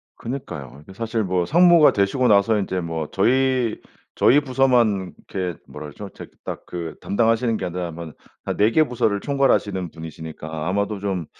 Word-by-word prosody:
그니까요. 75 - -7
이게 95 +5 -14
사실 115 +1 -2
뭐 90 -2 0
상무가 170 -1 +6
되시고 105 +6 +1
나서 105 +1 +4
인제 95 -2 -2
뭐 80 -2 -4
저희, 125 +2 +2 0.4
저희 145 - +5
부서만 125 -8 +2
이렇게 90 -4 -4
뭐라 75 - -8
그러죠. 100 +7 -9
저 - - -8 0.2
딱 - - -6
그 85 -2 -6
담당하시는 115 +1 +1
게 - - -4
아니라 90 -1 -4
뭐 80 -1 -8 0.3
한 - - -3
4 105 +3 +4
개 155 - +5
부서를 110 -6 0
총괄하시는 105 - +1
분이시니까 80 0 -7
아마도 100 +1 -1
좀 95 -5 -2
100 Hz, 355 characters per minute, -22 LUFS, 85-120 Hz, 0.4 s, 상무가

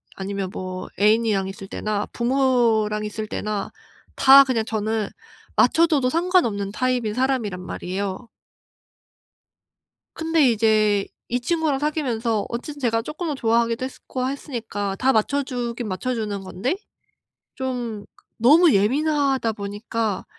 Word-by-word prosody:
아니면 195 -1 -4
뭐 185 0 -5
애인이랑 210 -2 +3
있을 195 0 -8
때나 210 0 -2
부모랑 235 -4 +2
있을 215 0 -5
때나 210 -1 -3 0.4
다 275 +1 +8
그냥 245 -4 0
저는 220 -1 -1 0.5
맞춰줘도 310 -6 +4
상관없는 320 - +1
타입인 245 -2 0
사람이란 250 -7 0
말이에요. 190 +5 -4 1.9
근데 320 -4 +2
이제 215 -2 +2 0.2
이 245 - -1
친구랑 305 +1 0
사귀면서 240 -8 -1
어쨌든 285 +5 -6
제가 230 -3 +1
쪼끔은 305 +3 -4
좋아하기도 230 0 +1
했으 265 - -9
고 255 0 -2
했으니까 225 -8 -4
다 265 +1 +3
맞춰 280 +6 +1
주긴 245 -3 -4
맞춰 205 +7 -2
주는 210 -4 -3
건데 210 - -2 0.8
좀 245 -5 -4 0.3
너무 305 +8 +6
예민하다 270 +2 +2
보니까 205 0 -3
230 Hz, 285 characters per minute, -23 LUFS, 210-265 Hz, 1.9 s, 다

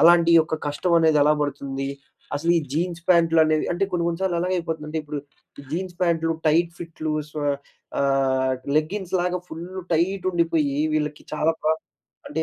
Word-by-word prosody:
అలాంటి 170 0 +6
ఒక 160 - -2
కష్టం 145 +5 -1
అనేది 160 -2 +4
ఎలా 150 +1 +5
పడుతుంది. 135 -1 -3 0.5
అసలు 165 +4 0
ఈ - - 0
జీన్స్ 170 +1 -2
ప్యాంట్లు 165 -2 +5
అనేవి 155 0 +2
అంటే 185 +3 +1
కొన్ని 170 -1 0
కొన్ని 170 +2 -3
సార్లు 180 -3 +1
ఎలా 180 - 0
అయిపోతుందంటే, 160 -2 -3
ఇప్పుడు 150 -1 -5 0.4
ఈ - - -12
జీన్స్ 180 +1 -3
ప్యాంట్లు, 165 -1 +2
టైట్ 165 +2 +3
ఫిట్లు, 160 -2 -4 0.2
స్వే 150 -1 -3 0.5
ఆహ్ 130 -1 +2 0.2
లెగ్గింగ్స్ 185 +4 -3
లాగా 180 0 0
ఫుల్లు 175 +4 -7
టైట్ 180 +4 +1
ఉండిపోయి 165 -5 +1 0.2
వీళ్ళకి 150 -1 -2
చాలా 160 +2 +2
ప్రా 155 - +3 0.6
అంటే 160 +2 -1
165 Hz, 165 wpm, -24 LUFS, 150-175 Hz, 0.6 s, అలాంటి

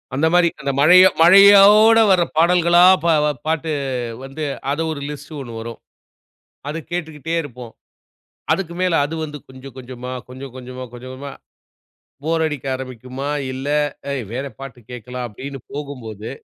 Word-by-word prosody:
அந்த 160 +4 +2
மாரி 175 -1 +5
அந்த 140 0 -1
மழையா 180 +5 +7
மழையோட 200 +5 +7
வர்ற 180 -2 +4
பாடல்களா? 175 +1 +4 0.2
பா 170 - +3 0.4
பாட்டு 160 0 -1 0.5
வந்து, 135 +3 -7 0.3
அது 150 +3 -2
ஒரு 140 -2 -6
லிஸ்டு 145 +1 -9
ஒண்ணு 120 -3 -9
வரும். 115 0 -7 0.9
அத 155 - -4
கேட்டுக்கிட்டே 160 -2 -4
இருப்போம். 125 -4 -10 0.8
அதுக்கு 170 -3 -3
மேல 180 -2 +1
அது 155 +3 -5
வந்து, 150 -1 -8
கொஞ்சம் 130 0 -12
கொஞ்சமா, 125 0 -8 0.2
கொஞ்சம் 130 0 -10
கொஞ்சமா, 130 0 -8
கொஞ்சம் 130 +1 -10
கொஞ்சமா, 140 +1 -8 0.9
போர் 160 0 0
அடிக்க 150 -3 -4
ஆரம்பிக்குமா, 130 +1 -7 0.2
இல்ல 135 +2 -6 0.4
அ - - -2 0.2
"வேற 135 +3 -3
பாட்டு 135 -2 -9
கேக்கலாம்" 125 +1 -6
அப்டின்னு 135 +5 -8
போகும்போது 120 -7 -7
140 Hz, 140 wpm, -20 LUFS, 130-165 Hz, 0.9 s, மழையா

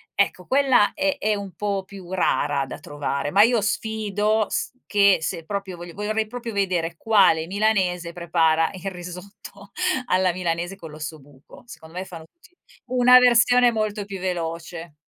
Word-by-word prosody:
ecco, 190 -2 0
quella 265 -6 +3
è 195 0 0
è 215 +1 +1
un 200 -3 -7
po' 200 0 -2
più 190 -2 -12
rara 145 -6 0
da - - -8
trovare. 145 0 -4
Ma 200 +2 +6
io 235 0 +3
sfido 215 0 0
s - - -2
che 200 -1 +4
se 165 0 -4
proprio 200 -1 -5
vogli 175 0 -9
vorrei 215 +2 -2
proprio 240 +1 -6
vedere, 180 -4 -1
quale 190 -7 +3
milanese 185 -4 0
prepara 165 -2 +1
il 195 +1 -6
risotto 195 +3 -11 0.4
alla 185 -3 +2
milanese 175 +1 -3
con 165 -5 -11
l'ossobuco. 150 - -11
Secondo 160 -8 -13
me, 185 - -3
fanno 170 -4 -10
tutti 345 +1 -24 0.3
una 250 0 +6
versione 245 0 +5
molto 215 -2 -2
più 195 -2 -7
veloce. 170 -2 -5
190 Hz, 155 wpm, -23 LUFS, 170-210 Hz, 0.4 s, Ma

